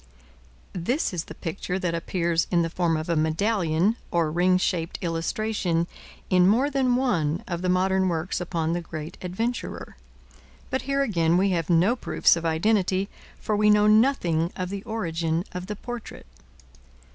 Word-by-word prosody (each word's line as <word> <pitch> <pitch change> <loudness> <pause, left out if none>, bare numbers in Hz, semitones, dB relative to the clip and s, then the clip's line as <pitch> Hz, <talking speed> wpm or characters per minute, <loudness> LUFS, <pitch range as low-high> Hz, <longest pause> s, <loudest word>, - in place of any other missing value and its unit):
This 195 - -1
is 170 -2 -3
the 155 - -10
picture 180 +3 -4
that 180 -3 -1
appears 170 0 0
in 170 -2 +2
the 165 - -3
form 170 -2 +1
of 155 +2 -4
a 170 - +1
medallion, 170 +4 +1
or 165 -3 +1
ring 180 +3 +3
shaped 175 -2 -1
illustration, 170 +1 -1 0.4
in 180 -1 +4
more 250 +8 +3
than 260 -3 +2
one 175 - 0
of 170 -1 -3
the 185 - -1
modern 190 +1 +2
works 170 +2 -2
upon 165 -2 -1
the 175 - -1
great 160 0 -7
adventurer. 225 +7 -4 0.8
But 260 - 0
here 275 0 +2
again 170 -8 +2
we 195 +1 +2
have 170 -2 -1
no 180 +8 +4
proofs 245 - +3
of 170 0 -4
identity, 190 +3 +1 0.3
for 215 - -1
we 210 0 +3
know 210 0 +5
nothing 210 - +3
of 185 -1 -3
the 200 -1 -4
origin 165 -6 -1
of 180 0 -6
the 210 - -4
portrait. 240 +2 -8
180 Hz, 165 wpm, -25 LUFS, 165-210 Hz, 0.8 s, know